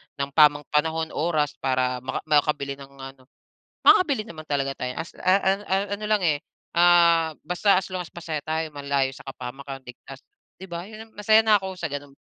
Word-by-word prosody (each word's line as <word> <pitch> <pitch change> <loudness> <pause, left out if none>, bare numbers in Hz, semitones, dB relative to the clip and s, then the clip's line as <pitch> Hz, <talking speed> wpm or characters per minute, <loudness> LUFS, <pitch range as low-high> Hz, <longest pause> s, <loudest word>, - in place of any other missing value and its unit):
ng 140 0 -3
tamang 150 0 +5
panahon, 160 +2 0
oras 155 -2 0
para 130 -1 0
maka 130 - -4
makabili 145 -2 +1
ng 135 - -10
ano. 135 -1 -11 0.6
makakabili 325 - +5
naman 155 -4 -10
talaga 135 -1 -1
tayo 125 0 -4
as, 170 - -5
a 185 - +2
a 190 -1 +2
a 190 - +1 0.2
ano 215 - -7
lang, 210 -2 +1
eh, 155 -4 +2 0.4
ah, 170 -2 +5
basta 185 +2 +3
as 190 - -4
long 185 -1 -3
as 170 - -13
masaya 160 -3 -5
tayo, 160 0 -2
malayo 140 -1 0
sa - - -14
kapahamakan, 135 +1 -8
ligtas, 130 +2 -12 0.4
di 190 - -9
ba? 170 +2 -5
Yun 220 +1 -12
masaya 215 +2 +4
na 215 -2 +5
ako 190 -1 -6
sa 160 -4 -3
ganun. 145 -1 -7
155 Hz, 190 wpm, -24 LUFS, 140-180 Hz, 0.6 s, tamang